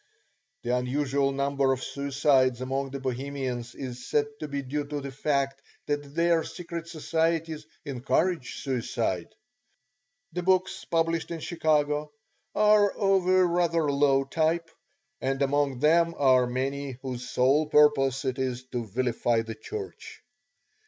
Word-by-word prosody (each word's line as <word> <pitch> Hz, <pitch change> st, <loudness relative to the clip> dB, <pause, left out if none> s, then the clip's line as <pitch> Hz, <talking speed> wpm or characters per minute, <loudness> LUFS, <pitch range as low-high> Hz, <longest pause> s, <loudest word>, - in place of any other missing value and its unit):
The 120 Hz, +1 st, +1 dB
unusual 135 Hz, +2 st, 0 dB
number 140 Hz, 0 st, +1 dB
of 130 Hz, -1 st, -1 dB
suicides 140 Hz, -3 st, +2 dB
among 135 Hz, +1 st, -2 dB
the 140 Hz, +1 st, -5 dB
Bohemians 130 Hz, -2 st, -4 dB
is 125 Hz, -2 st, -6 dB
said 145 Hz, -1 st, +3 dB
to 155 Hz, -, -4 dB
be 140 Hz, -1 st, -3 dB
due 145 Hz, +3 st, -2 dB
to 145 Hz, 0 st, -3 dB
the 140 Hz, -1 st, -6 dB
fact 135 Hz, 0 st, -1 dB, 0.2 s
that 145 Hz, -1 st, -3 dB
their 170 Hz, -1 st, +3 dB
secret 170 Hz, -2 st, -7 dB
societies 160 Hz, -1 st, -1 dB, 0.2 s
encourage 140 Hz, +3 st, -1 dB
suicide. 115 Hz, -, -2 dB, 1.0 s
The 180 Hz, -, -2 dB
books 185 Hz, +1 st, +1 dB
published 165 Hz, 0 st, 0 dB
in 170 Hz, -, -4 dB
Chicago 150 Hz, -2 st, 0 dB, 0.4 s
are 210 Hz, -1 st, +5 dB
of 195 Hz, -2 st, +1 dB
a 185 Hz, 0 st, +5 dB
rather 170 Hz, -3 st, +1 dB
low 140 Hz, -1 st, +3 dB
type, 165 Hz, +3 st, 0 dB, 0.5 s
and 135 Hz, 0 st, -1 dB
among 140 Hz, -1 st, +1 dB
them 165 Hz, +4 st, +3 dB
are 130 Hz, -3 st, +4 dB
many 135 Hz, +2 st, -2 dB
whose 125 Hz, -1 st, -5 dB
sole 140 Hz, +5 st, +3 dB
purpose 145 Hz, -3 st, +4 dB
it 130 Hz, 0 st, -1 dB
is 130 Hz, -1 st, -2 dB
to 120 Hz, -2 st, -3 dB
vilify 120 Hz, +1 st, 0 dB
the 115 Hz, 0 st, -6 dB
Church. 435 Hz, -, -8 dB
140 Hz, 135 wpm, -27 LUFS, 130-165 Hz, 1.0 s, are